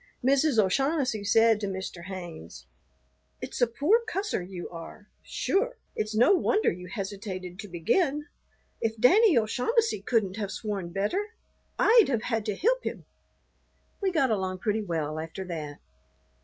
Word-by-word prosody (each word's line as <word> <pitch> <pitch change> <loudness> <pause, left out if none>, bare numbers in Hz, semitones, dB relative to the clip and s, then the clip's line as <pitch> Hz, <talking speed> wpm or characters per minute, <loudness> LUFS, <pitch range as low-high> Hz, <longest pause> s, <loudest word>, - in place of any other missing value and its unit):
Mrs. 275 0 +3
O'Shaughnessy 255 - +1
said 225 +2 +4
to 205 - -3
Mr. 190 -2 -5
Haynes, 175 - -8 0.7
"It's - - -6
a 245 - +5
poor 300 - +2
cusser 410 - -2
you 180 -1 -7
are. 175 +5 -10
Sure, - - -1 0.2
it's 215 0 -2
no 240 - +5
wonder 415 +3 +2
you 180 +1 -8
hesitated 190 -2 -6
to 205 - -6
begin. 275 - 0 0.6
If 225 0 -1
Danny 375 - +6
O'Shaughnessy 250 - +1
couldn't 205 -3 0
have 205 -3 -3
sworn 200 -5 -4
better, 365 - -2 0.4
I'd 460 -2 +6
have 235 -5 0
had 225 -3 -2
to 210 - -1
hilp - - +1
him." - - -5 1.0
We 390 -1 +1
got 275 -8 +2
along 190 -3 -1
pretty 215 +3 -1
well 160 -5 -3
after 165 +4 -6
that. 155 -5 -6
215 Hz, 145 wpm, -27 LUFS, 185-285 Hz, 1.0 s, Danny